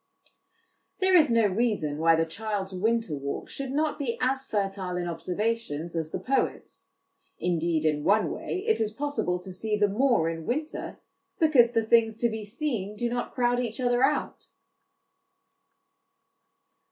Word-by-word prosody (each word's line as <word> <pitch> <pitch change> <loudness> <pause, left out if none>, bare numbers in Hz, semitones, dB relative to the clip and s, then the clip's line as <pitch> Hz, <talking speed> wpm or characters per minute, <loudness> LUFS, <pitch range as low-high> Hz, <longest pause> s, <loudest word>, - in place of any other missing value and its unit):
There 375 -1 +4
is 315 -4 +6
no 230 -2 +4
reason 200 -8 0
why 165 0 +5
the 165 0 +2
child's 200 +2 -4
winter 220 -2 0
walk 140 0 -5
should 275 -1 -5
not 305 +3 0
be 250 -5 -2
as 265 +1 0
fertile 195 -3 -2
in 175 -1 -2
observations 175 -2 -3
as 160 -1 -2
the - - -3
poet's; 270 +1 -2 0.5
indeed, 170 -2 0
in 150 -1 +1
one 210 +5 +3
way, 380 - -4
it 445 - +2
is 215 -1 0
possible 280 -8 -1
to 185 +1 -9
see 210 +3 -2
the 205 0 +3
more 230 -4 +2
in 165 -1 -4
winter, 300 +5 -3 0.4
because 265 -8 +5
the 225 -1 +1
things 225 -1 +3
to 235 - +1
be 220 -1 -5
seen 210 -3 -3
do 235 +3 -1
not 245 0 -3
crowd 245 -1 +2
each 235 -1 -3
other 245 0 +2
out. 295 +2 0
220 Hz, 155 wpm, -27 LUFS, 180-245 Hz, 0.5 s, is